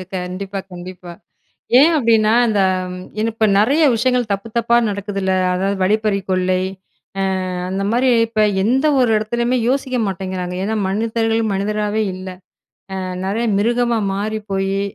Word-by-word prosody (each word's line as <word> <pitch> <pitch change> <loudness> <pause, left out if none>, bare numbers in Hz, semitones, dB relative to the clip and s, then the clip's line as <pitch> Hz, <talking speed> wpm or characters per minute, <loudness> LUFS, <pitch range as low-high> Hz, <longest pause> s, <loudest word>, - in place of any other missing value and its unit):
அ, - - -5
கண்டிப்பா, 185 +2 -5
கண்டிப்பா! 180 0 -9 0.7
ஏன் 310 +5 +6
அப்படின்னா, 225 -5 +3
அந்த 210 -3 +1 0.3
ம், 180 - -7 0.2
ஏன்னா 220 +1 +1
இப்ப 220 -1 +2
நெறைய 280 +10 +3
விஷயங்கள் 245 0 +1
தப்பு 200 +3 -3
தப்பா 235 0 +3
நடக்குதுல்ல? 200 -1 -2 0.2
அதாவது 195 +2 -1
"வழிப்பறிக்கொள்ளை" 190 -3 +1 0.9
அ - - -3 0.2
அந்த 195 +1 -2
மாரி, 250 +3 +2 0.2
இப்ப 220 -1 0 0.2
எந்த 260 +7 +2
ஒரு 250 -2 +3
இடத்துலயுமே 235 +3 0
யோசிக்க 260 -1 -1
மாட்டேங்கிறாங்க. 185 -1 -4
ஏன்னா 220 +3 -1
மனிதர்கள், 225 +2 0
மனிதராவே 210 +2 -1
இல்ல. 185 0 -7 0.7
அ - - -3 0.2
நெறைய 215 +5 -1
மிருகமா 235 +2 +1 0.2
மாறி 215 +2 -2
போயி, 195 0 0
210 Hz, 135 wpm, -19 LUFS, 195-230 Hz, 0.9 s, ஏன்